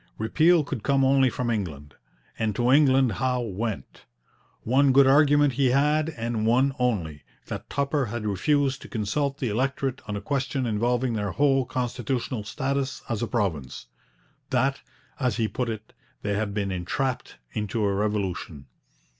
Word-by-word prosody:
Repeal 160 +9 +3
could 140 -5 -5
come 135 +3 +2
only 135 -1 +4
from 120 -1 -2
England, 75 -10 -4 0.5
and 110 -2 0
to 120 +3 +2
England 135 -3 +5
Howe 125 -1 +1
went. 110 -1 -5 0.6
One 135 +4 +3
good 140 +1 +7
argument 145 0 +5
he 135 0 +2
had, 150 +4 +2
and 115 -1 -2
one 130 +4 +3
only, 90 -12 -1 0.2
that - - -7
Tupper 140 -1 0
had 115 0 -4
refused 135 +7 +1
to - - -10
consult 135 +6 -1
the 130 -5 -2
electorate 135 +4 -1
on 105 -1 -3
a - - -3
question 135 +2 -1
involving 120 +3 0
their 105 -2 -1
whole 135 -2 +3
constitutional 125 -2 -2
status 135 +4 -2
as 115 -3 -2
a 120 - -1
province; 95 - -2 0.6
that, 130 +2 +1 0.4
as 125 -3 0
he 115 -2 +1
put 115 +4 -3
it, 110 -1 -7 0.3
they 105 - -1
had 105 0 -1
been 100 -1 -2
entrapped 125 +9 -3 0.2
into 105 +1 -2
a 100 - +1
revolution. 95 -8 -2
125 Hz, 155 wpm, -25 LUFS, 105-135 Hz, 0.6 s, good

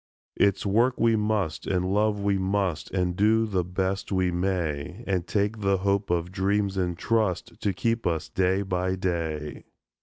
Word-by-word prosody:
It's 100 0 +2
work 115 +6 +2
we 115 -1 +4
must, 105 -6 -1
and 95 0 0
love 105 0 +2
we 100 -1 +1
must, 95 -3 -1
And 90 -2 -1
do 110 +3 +3
the 95 -4 0
best 95 +3 -2
we 95 -2 +1
may, 90 0 -2
And 90 -3 -1
take 105 +3 0
the 100 -1 +2
hope 100 +1 0
of 85 0 0
dreams 100 +1 0
in 90 -2 -1
trust 110 -1 -1
To 100 - +1
keep 115 +4 -1
us 80 -2 -1
day 95 +1 +1
by 95 -1 -1
day. 80 -5 -3
95 Hz, 170 wpm, -26 LUFS, 90-105 Hz, -, we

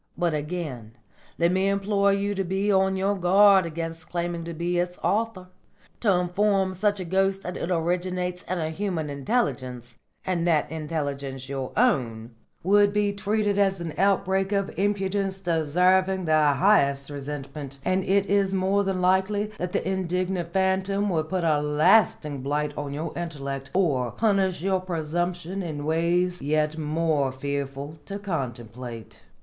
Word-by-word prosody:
But 175 -2 +1
again 150 -7 -4 0.4
let 170 +1 +3
me 190 +1 +2
implore 200 0 +2
you 200 +1 0
to 195 -1 -1
be 190 +3 0
on 190 0 +3
your 195 +2 +1
guard 195 0 +5
against 165 0 -5
claiming 170 -1 -2
to 170 - -5
be 175 +2 -1
its 180 0 -2
author. 205 -4 -1 0.5
To 215 - +3
inform 190 +2 +1
such 205 +2 +1
a 185 - -4
ghost 195 +2 +1
that 180 - -5
it 170 - -4
originates 180 +1 -1
in 185 - -1
a 160 -1 -2
human 165 -4 -3
intelligence, 130 - -2 0.3
and 175 -2 0
that 155 -3 +2
intelligence 140 -4 -4
your 135 -2 -4
own, 120 - +1 0.3
would 205 +2 +4
be 205 -1 +1
treated 205 0 0
as 195 -2 +2
an 165 -3 -5
outbreak 195 0 +1
of 200 -1 0
impudence 195 -1 0
deserving 180 +2 +2
the 155 -1 +4
highest 140 -6 +3
resentment, 140 0 -6
and 185 +1 +1
it 195 +1 +2
is 195 -1 +1
more 190 +2 +2
than 190 -2 -1
likely 190 +3 +1
that 180 0 -3
the - - -1
indignant 185 -2 -1
phantom 190 +2 +1
would 155 -2 -1
put 185 -2 -1
a 155 -3 +2
lasting 150 -1 +3
blight 145 +2 -1
on 145 -1 -4
your 155 +3 -4
intellect 140 -5 -5
or 140 -10 +2
punish 195 - +1
your 190 -1 +1
presumption 175 +2 -2
in 150 -5 -5
ways 175 +3 +1
yet 150 +2 +1
more 155 -3 0
fearful 140 +2 -4
to 200 +5 -5
contemplate." 120 - -6
175 Hz, 155 wpm, -25 LUFS, 150-195 Hz, 0.5 s, guard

